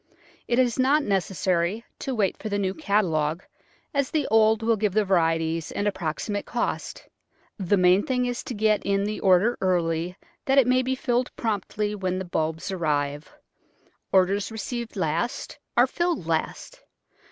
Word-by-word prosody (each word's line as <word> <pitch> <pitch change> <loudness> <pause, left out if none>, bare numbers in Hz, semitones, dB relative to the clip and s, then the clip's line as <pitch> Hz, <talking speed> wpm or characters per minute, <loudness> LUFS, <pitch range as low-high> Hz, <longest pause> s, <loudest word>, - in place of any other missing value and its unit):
It 240 - +1
is 250 -1 +2
not 280 +4 +3
necessary 190 0 0
to 265 - -3
wait 200 -5 +1
for 215 - -6
the 205 - -1
new 190 -2 -1
catalogue, 175 - 0 0.5
as 280 -2 0
the 305 -3 0
old 220 0 +4
will 230 0 +3
give 210 -2 0
the 215 0 +2
varieties 165 -3 +1
and 205 - -1
approximate 195 +2 -3
cost. 240 - -3 0.5
The 195 +1 +2
main 180 +1 +5
thing 250 -1 0
is 245 0 -3
to 245 - -5
get 215 0 +2
in 200 0 +1
the 210 +1 -3
order 195 +5 +3
early 175 -1 0 0.3
that 270 -1 +2
it 270 - +7
may 255 +1 +3
be 260 +1 -1
filled 250 -2 0
promptly 210 -1 -2
when 185 -3 -2
the 190 - -4
bulbs 160 +1 -2
arrive. 150 -4 -1 0.8
Orders 195 +3 +2
received 230 +2 -5
last 175 - -2 0.2
are - - +7
filled 345 - -1
last. 165 - -3
205 Hz, 160 wpm, -25 LUFS, 180-235 Hz, 0.8 s, it